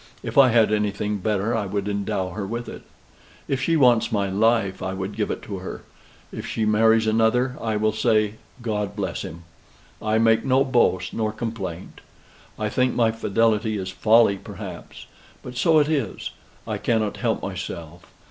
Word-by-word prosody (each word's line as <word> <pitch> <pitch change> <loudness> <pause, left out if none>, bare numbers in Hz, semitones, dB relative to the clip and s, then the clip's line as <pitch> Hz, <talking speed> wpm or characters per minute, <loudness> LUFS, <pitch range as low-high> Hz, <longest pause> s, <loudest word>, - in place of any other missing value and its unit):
If - - -5
I 135 -2 +7
had 110 -2 +4
anything 105 0 -1
better, 105 +3 0
I 105 -3 -1
would 100 +1 -2
endow 100 -2 -2
her 100 +2 -4
with 120 +3 -4
it. - - -8 0.7
If 135 -1 -1
she 165 +4 +2
wants 125 -5 +4
my 100 -3 0
life, 105 -1 +2
I 95 0 -3
would 95 +2 -5
give 105 -1 -1
it - - -4
her. 95 -2 -6 0.5
If - - -5
she 110 - -1
marries 110 +1 +4
another, 115 +4 +2
I 110 -1 -1
will 110 +1 +2
say 110 -2 +1 0.3
God 105 -3 -2
bless - - -3
him. 85 +1 -8 0.6
I 110 0 +1
make 115 0 +3
no 135 0 +3
boast, 95 -8 +1
nor 110 -1 -1
no 105 - -8
complaint. 100 -7 -6 0.6
I 110 - -1
think 125 +3 +1
my 115 -2 +3
fidelity 110 0 +1
is 95 -1 -4
folly, 110 +1 +4
perhaps. 95 -3 -9 0.4
But 125 - -8
so 160 +6 +3
it 150 -1 +4
is. 140 -10 -2 0.3
I - - -3
cannot 110 -3 0
help 115 -3 -1
myself. 85 -3 -6
110 Hz, 175 wpm, -23 LUFS, 100-115 Hz, 0.7 s, I